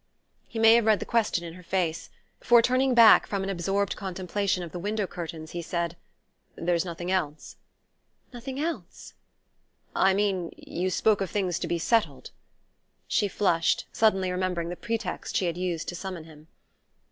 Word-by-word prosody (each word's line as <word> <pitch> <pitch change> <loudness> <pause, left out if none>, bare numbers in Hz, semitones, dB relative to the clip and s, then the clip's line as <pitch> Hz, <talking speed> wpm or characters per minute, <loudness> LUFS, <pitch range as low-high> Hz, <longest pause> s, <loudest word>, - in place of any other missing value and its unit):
He 230 - -8
may 225 0 +7
have 230 -1 +3
read 215 -3 +4
the - - -5
question 220 -7 +1
in 165 -1 -7
her 180 - -12
face, 170 -2 -2 0.3
for 240 0 +5
turning 255 +1 +2
back 230 -2 +8
from 200 -2 -2
an 195 - -2
absorbed 195 +2 -1
contemplation 190 0 -2
of 170 - -8
the 175 - -6
window 210 +2 -1
curtains 165 -3 -7
he 175 - -4
said: 170 0 -3 0.6
"There's 170 0 0
nothing 175 0 -5
else?" 155 -5 -2 0.8
"Nothing 260 +3 -6
else?" 330 +3 -5 0.8
"I 190 0 +4
mean: 195 -4 0
you 180 +2 -3
spoke 205 +2 +2
of 195 - -1
things 185 -5 -1
to - - -3
be 170 - 0
settled 225 +6 0 0.4
" - - -46
She 210 - +3
flushed, 175 -4 +1
suddenly 195 -4 +2
remembering 180 -2 -2
the 175 - -4
pretext 230 +5 -4
she 185 - +2
had 170 -1 -1
used 175 -2 -3
to 175 - -5
summon 185 -2 -6
him. 155 -1 -16
185 Hz, 170 wpm, -27 LUFS, 170-210 Hz, 0.8 s, back